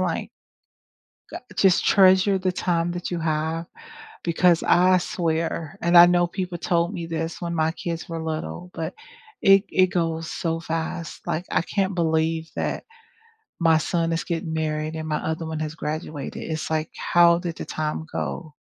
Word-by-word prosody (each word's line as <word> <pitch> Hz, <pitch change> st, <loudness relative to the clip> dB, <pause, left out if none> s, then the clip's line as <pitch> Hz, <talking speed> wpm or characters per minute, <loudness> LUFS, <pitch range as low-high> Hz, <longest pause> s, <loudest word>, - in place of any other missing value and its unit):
like -, -, -2 dB, 1.0 s
...g -, -, -5 dB, 0.2 s
just 190 Hz, 0 st, +4 dB
treasure 190 Hz, 0 st, +5 dB
the 185 Hz, 0 st, 0 dB
time 175 Hz, -1 st, 0 dB
that 175 Hz, +1 st, -5 dB
you 175 Hz, -, -2 dB
have 160 Hz, +1 st, -1 dB, 0.6 s
because 170 Hz, 0 st, +3 dB
I 185 Hz, +1 st, +5 dB
swear, 165 Hz, -2 st, -2 dB
and 170 Hz, 0 st, +6 dB
I 175 Hz, -, +11 dB
know 175 Hz, 0 st, +3 dB
people 180 Hz, -1 st, -4 dB
told 170 Hz, +2 st, 0 dB
me 170 Hz, -3 st, -4 dB
this 165 Hz, 0 st, -4 dB
when 170 Hz, -1 st, -3 dB
my 160 Hz, 0 st, +1 dB
kids 170 Hz, 0 st, -5 dB
were 165 Hz, -1 st, -4 dB
little, 160 Hz, -, -5 dB
but 160 Hz, -1 st, -4 dB, 0.5 s
it 195 Hz, +1 st, +6 dB
it 185 Hz, -, +4 dB
goes 165 Hz, -3 st, -2 dB
so 165 Hz, -1 st, -2 dB
fast, 165 Hz, 0 st, -4 dB
like, 165 Hz, +3 st, -2 dB
I -, -, +2 dB
can't 195 Hz, +1 st, -1 dB
believe 160 Hz, 0 st, 0 dB
that -, -, -2 dB, 0.8 s
my 165 Hz, -1 st, +5 dB
son 165 Hz, +1 st, 0 dB
is 165 Hz, -, -2 dB
getting 165 Hz, -1 st, -3 dB
married 155 Hz, 0 st, -2 dB
and 160 Hz, 0 st, -4 dB
my 155 Hz, -1 st, 0 dB
other 160 Hz, +1 st, -3 dB
one 160 Hz, -1 st, -4 dB
has 155 Hz, 0 st, -3 dB
graduated, 155 Hz, -2 st, -5 dB
it's 160 Hz, 0 st, -3 dB
like, 155 Hz, 0 st, 0 dB
"How 170 Hz, 0 st, +4 dB
did 170 Hz, -2 st, -5 dB
the -, -, -6 dB
time 155 Hz, +1 st, -3 dB
go?" 155 Hz, -3 st, -4 dB
165 Hz, 170 wpm, -24 LUFS, 160-175 Hz, 1.0 s, I